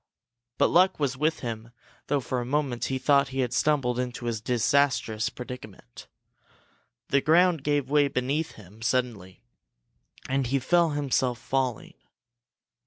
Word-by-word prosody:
But -, -, +3 dB
luck 185 Hz, +1 st, +4 dB
was 140 Hz, -3 st, 0 dB
with 155 Hz, +4 st, 0 dB
him 115 Hz, -2 st, -5 dB, 0.4 s
though 145 Hz, -1 st, +1 dB
for 125 Hz, 0 st, -3 dB
a -, -, -3 dB
moment 130 Hz, -1 st, -1 dB
he 135 Hz, -, -1 dB
thought 140 Hz, +1 st, +3 dB
he 135 Hz, -1 st, -2 dB
had 125 Hz, -1 st, -2 dB
stumbled 130 Hz, -5 st, +1 dB
into 125 Hz, -1 st, -4 dB
a 120 Hz, -, 0 dB
disastrous 120 Hz, 0 st, +1 dB
predicament. 110 Hz, -, -10 dB, 1.0 s
The 140 Hz, -, +3 dB
ground 165 Hz, 0 st, +3 dB
gave 145 Hz, -2 st, 0 dB
way 145 Hz, 0 st, +3 dB
beneath 140 Hz, +4 st, -2 dB
him 105 Hz, +1 st, -16 dB
suddenly 115 Hz, -, -2 dB, 0.8 s
and 135 Hz, -1 st, 0 dB
he 135 Hz, +3 st, +1 dB
felt 165 Hz, +3 st, +2 dB
himself 130 Hz, -4 st, 0 dB
falling. 130 Hz, -2 st, -2 dB
130 Hz, 140 wpm, -26 LUFS, 120-145 Hz, 1.0 s, luck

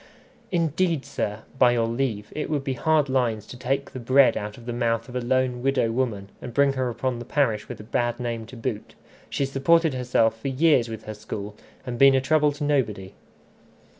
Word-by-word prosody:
"Indeed, 170 Hz, -2 st, +1 dB
sir, 105 Hz, +1 st, -3 dB, 0.2 s
by 125 Hz, -1 st, +6 dB
your 115 Hz, -1 st, +1 dB
leave, 115 Hz, -3 st, -2 dB
it 150 Hz, -, -3 dB
would 145 Hz, -3 st, -1 dB
be 135 Hz, -, -1 dB
hard 155 Hz, +2 st, +2 dB
lines 120 Hz, -5 st, 0 dB
to -, -, -10 dB
take 135 Hz, +2 st, -2 dB
the 130 Hz, -, -7 dB
bread 130 Hz, +3 st, +4 dB
out 105 Hz, +2 st, -5 dB
of 120 Hz, -, -13 dB
the 120 Hz, -, -3 dB
mouth 115 Hz, -1 st, 0 dB
of 125 Hz, -, -10 dB
a 125 Hz, -, -1 dB
lone 125 Hz, 0 st, 0 dB
widow 130 Hz, -3 st, +1 dB
woman, 115 Hz, -5 st, -2 dB
and 120 Hz, -, -8 dB
bring 140 Hz, -1 st, +4 dB
her 130 Hz, -2 st, -1 dB
upon 120 Hz, +1 st, -2 dB
the -, -, -6 dB
parish 115 Hz, -5 st, 0 dB
with -, -, -7 dB
a -, -, -8 dB
bad 120 Hz, +2 st, -1 dB
name 115 Hz, -2 st, -4 dB
to 125 Hz, -, -11 dB
boot. 115 Hz, -2 st, -5 dB, 0.3 s
She's 135 Hz, -1 st, -2 dB
supported 160 Hz, +3 st, +3 dB
herself 125 Hz, -3 st, +1 dB
for -, -, -3 dB
years 135 Hz, -3 st, +3 dB
with 110 Hz, -1 st, -7 dB
her 110 Hz, -, -6 dB
school, 105 Hz, 0 st, -7 dB, 0.3 s
and 120 Hz, -2 st, -5 dB
been 135 Hz, 0 st, +7 dB
a -, -, +4 dB
trouble 150 Hz, +2 st, +3 dB
to 145 Hz, +1 st, -6 dB
nobody." 110 Hz, -10 st, -1 dB
125 Hz, 210 wpm, -25 LUFS, 115-135 Hz, 0.3 s, been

